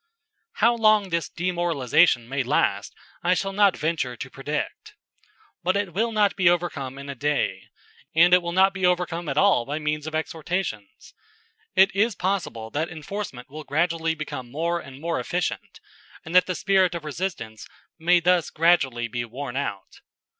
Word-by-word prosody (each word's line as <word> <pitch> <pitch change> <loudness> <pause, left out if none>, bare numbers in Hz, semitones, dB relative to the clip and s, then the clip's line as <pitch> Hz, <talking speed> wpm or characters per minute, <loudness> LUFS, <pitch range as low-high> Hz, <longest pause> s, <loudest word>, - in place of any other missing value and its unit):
How 235 +3 +3
long 215 -3 +3
this 170 -1 -1
demoralization 170 -7 +2
may 135 +2 -1
last 125 - 0 0.3
I 180 +1 +2
shall 195 +2 -2
not 200 -1 +4
venture 150 -6 -2
to 130 - -7
predict. 145 +2 -5 0.7
But 185 +3 +1
it 200 -4 -2
will 230 +4 0
not 210 -2 +2
be 185 -3 +4
overcome 155 -7 -2
in 140 0 -8
a 140 - -4
day; 140 -8 -1 0.5
and 175 +2 +6
it 180 - +7
will 170 0 -4
not 190 +2 +4
be 190 -1 -6
overcome 175 -2 0
at 140 - -3
all 190 -9 +4
by 145 +5 -4
means 150 0 -2
of 155 - -4
exhortations. 160 - -4 0.6
It 190 +1 +5
is 215 +1 +2
possible 175 - -3
that 155 +3 -2
enforcement 160 -5 -6
will 155 +3 -9
gradually 160 +2 0
become 130 -5 -6
more 170 +6 -1
and 135 -4 -11
more 165 -1 -2
efficient, 175 +8 -3 0.5
and 160 - -7
that 180 0 +5
the 185 - -2
spirit 190 -3 +2
of 165 -2 -6
resistance 145 - -5 0.3
may 175 +2 +4
thus 175 -2 +2
gradually 135 -8 +2
be 120 +1 -3
worn 125 +2 -7
out. 100 -8 -5
165 Hz, 170 wpm, -24 LUFS, 140-180 Hz, 0.7 s, it